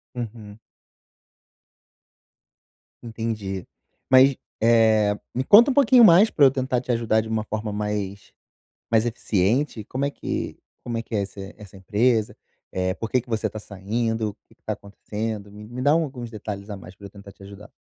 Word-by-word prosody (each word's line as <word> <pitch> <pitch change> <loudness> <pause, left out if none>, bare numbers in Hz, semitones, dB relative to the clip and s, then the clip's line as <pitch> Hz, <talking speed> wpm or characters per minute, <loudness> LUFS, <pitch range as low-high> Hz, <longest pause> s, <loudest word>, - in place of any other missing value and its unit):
Uhum. 110 -3 -7 2.5
Entendi, 110 -5 -4 0.4
mas, 130 +1 +6 0.3
eh, 110 -3 +4 0.2
me 130 - 0
conta 230 - +7
um - - -5
pouquinho 260 -3 +6
mais 205 +3 +7
pra 145 - +4
eu 135 - +6
tentar 130 -2 -1
te 125 -1 -2
ajudar 115 -1 +1
de 110 - -6
uma 110 -1 -1
forma 110 0 -4
mais 105 -1 -4 0.6
mais 115 0 +3
eficiente, 115 +2 0
como 130 +6 -3
é 140 - 0
que - - -5 0.3
como 120 -1 -3
é - - -3
que 115 - -9
é 105 - +1
essa 100 0 -8 0.2
essa 100 -2 -13
empresa, 110 +3 +1 0.6
por 115 - -3
que 125 - +2
que 125 - -26
você 110 -2 -1
tá 110 - -8
saindo, 110 +3 -2
o - - -13
que - - -23
que - - -47
tá 110 - -3
acontecendo, 105 +1 -6
me 105 +1 -11
me 120 +3 -7
dá 145 +3 +3
alguns 135 -7 -1
detalhes 105 -2 -7
a 100 - -5
mais 95 -1 -12
pra 100 +2 -12
eu - - -11
tentar 100 0 -13
te 100 - -19
ajudar. 100 +1 -12
110 Hz, 180 wpm, -24 LUFS, 105-125 Hz, 2.5 s, conta